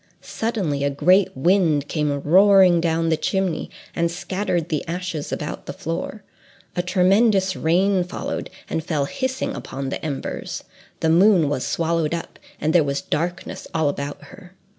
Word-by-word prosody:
Suddenly, 190 -12 -2
a 140 - +2
great 180 +5 +3
wind 160 -2 +2
came 150 -3 -1
roaring 185 0 +6
down 165 0 +1
the 160 - +3
chimney, 190 -3 -1 0.3
and 170 0 +1
scattered 180 -1 -2
the 155 - -1
ashes 175 -3 -4
about 150 - -5
the - - -4
floor; 170 +5 -5 0.5
a 175 - +1
tremendous 190 +2 +3
rain 185 +3 +2
followed, 180 - -5 0.2
and 160 - -2
fell 150 -4 0
hissing 260 - -3
on 135 0 -5
the - - -5
embers; 145 -4 -4 0.4
the 160 - +2
moon 175 -3 +5
was 130 -3 -2
swallowed 165 -1 0
up, 170 - -8 0.2
and 155 +1 0
there 175 - +5
was 140 -1 -1
darkness 175 +4 -3
all 160 -3 +2
about 140 0 -5
her. 180 0 -15
170 Hz, 155 wpm, -22 LUFS, 150-190 Hz, 0.5 s, roaring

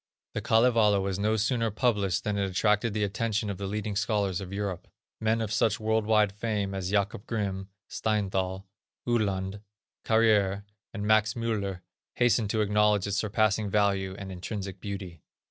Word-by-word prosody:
The - - -2
Kalevala 110 -3 +4
was 95 0 -2
no 105 +2 +2
sooner 115 +1 +1
published 105 -5 0
than 105 - -1
it 100 -1 0
attracted 105 +3 +1
the 105 - +1
attention 105 +1 -1
of 95 - -7
the 100 - -3
leading 105 0 -3
scholars 100 -3 0
of 95 -1 -7
Europe. 100 -3 -4 0.3
Men 110 +1 +1
of 110 -2 -2
such 105 0 +2
world 110 0 0
wide 110 -2 +4
fame 105 -1 -2
as 95 -2 -3
Jacob 100 +1 -1
Grimm, 100 -3 -3 0.2
Steinthal, 95 -3 -1 0.4
Uhland, 100 -4 0 0.4
Carrière 105 -3 +3 0.3
and 105 -1 -4
Max 110 +1 +3
Müller 105 -6 -2 0.3
hastened 120 -3 +2
to 110 +1 +1
acknowledge 105 -1 +3
its 100 0 -1
surpassing 110 0 +1
value 100 -2 +1
and 95 -1 -7
intrinsic 95 +1 -5
beauty. 95 -5 -6
105 Hz, 160 wpm, -28 LUFS, 95-110 Hz, 0.4 s, Kalevala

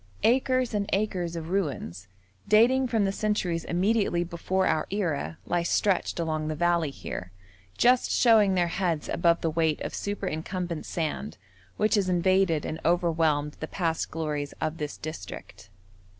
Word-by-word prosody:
Acres 255 0 +2
and 205 -1 -1
acres 185 -4 -1
of 165 0 -5
ruins, 130 - -2 0.4
dating 250 +5 +5
from 225 -4 +1
the 195 - +1
centuries 195 -5 -1
immediately 185 -1 +1
before 180 +2 -1
our 155 - +1
era, 160 - -2
lie 175 0 0
stretched 180 +1 +1
along 155 -2 -1
the 155 - -2
valley 170 -1 +1
here, 90 -8 -7 0.5
just 250 +1 +4
showing 215 -5 +4
their 175 -1 +2
heads 170 -4 -1
above 170 0 +2
the 165 - +1
weight 160 -1 +1
of - - -4
superincumbent 180 -3 -4
sand 150 - -3 0.4
which 215 +1 +2
has 200 -3 +2
invaded 180 -2 +2
and 160 - -4
overwhelmed 160 -4 +1
the 155 - -4
past 165 -3 -1
glories 150 -3 -3
of 155 +1 -2
this 150 -1 -4
district. 155 -8 -8
175 Hz, 150 wpm, -27 LUFS, 155-200 Hz, 0.5 s, dating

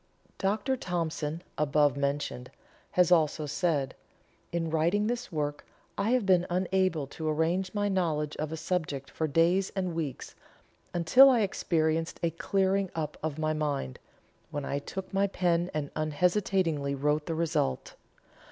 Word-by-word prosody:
Dr. 215 +7 0
Thompson, 165 -4 -3 0.2
above 145 -2 +3
mentioned, 140 -3 -2 0.4
has 180 -1 +4
also 155 -2 +3
said: 145 -2 0 0.6
"In 165 -2 -1
writing 170 +6 +2
this 240 -1 -2
work 145 -2 -2 0.3
I 200 +2 0
have 250 -3 +2
been 180 -2 +4
unable 185 -3 +1
to 155 +3 -4
arrange 170 +5 0
my 205 0 +1
knowledge 160 -6 0
of 155 0 -3
a 160 - -4
subject 155 -5 -3
for 160 - -1
days 170 +6 +3
and 185 -3 -1
weeks, 155 -6 -4 0.6
until 175 +11 +7
I 245 -4 +4
experienced 165 -4 0
a 170 - +2
clearing 190 +3 +1
up 155 -2 -3
of 155 -2 -3
my 155 0 0
mind, 145 - -2 0.5
when 145 -1 -4
I 140 - -1
took 190 +7 -7
my 195 +1 +3
pen 175 -2 +1
and 150 -2 -3
unhesitatingly 160 -2 +1
wrote 150 +2 0
the 165 - -1
result. 160 - -1
165 Hz, 145 wpm, -29 LUFS, 150-185 Hz, 0.6 s, until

